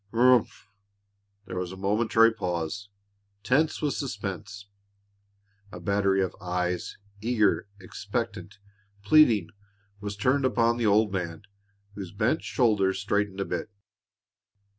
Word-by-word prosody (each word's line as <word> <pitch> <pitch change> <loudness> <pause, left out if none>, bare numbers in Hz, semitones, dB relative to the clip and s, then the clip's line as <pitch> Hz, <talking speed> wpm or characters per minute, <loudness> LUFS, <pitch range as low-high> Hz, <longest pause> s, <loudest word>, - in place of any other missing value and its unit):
"Humph!" 125 0 +3 0.8
There 95 -1 -5
was 90 -1 -4
a 95 - -9
momentary 110 +3 +3
pause, 90 0 -4 0.5
tense 145 +8 +1
with 145 - +1
suspense. 100 -4 -5 1.1
A - - -8
battery 100 -1 +1
of 95 - -4
eyes, 90 -1 -2 0.2
eager, 110 -3 +1
expectant, 100 0 -5 0.5
pleading, 110 - +5 0.5
was 105 0 -6
turned 130 +6 +2
upon 120 -2 +2
the 115 -2 +1
old 105 0 +3
man, 90 +1 -4 0.5
whose 95 -3 -7
bent 110 +10 0
shoulders 105 -6 +1
straightened 100 0 -1
a - - -1
bit. - - -4
100 Hz, 115 wpm, -27 LUFS, 95-115 Hz, 1.1 s, pleading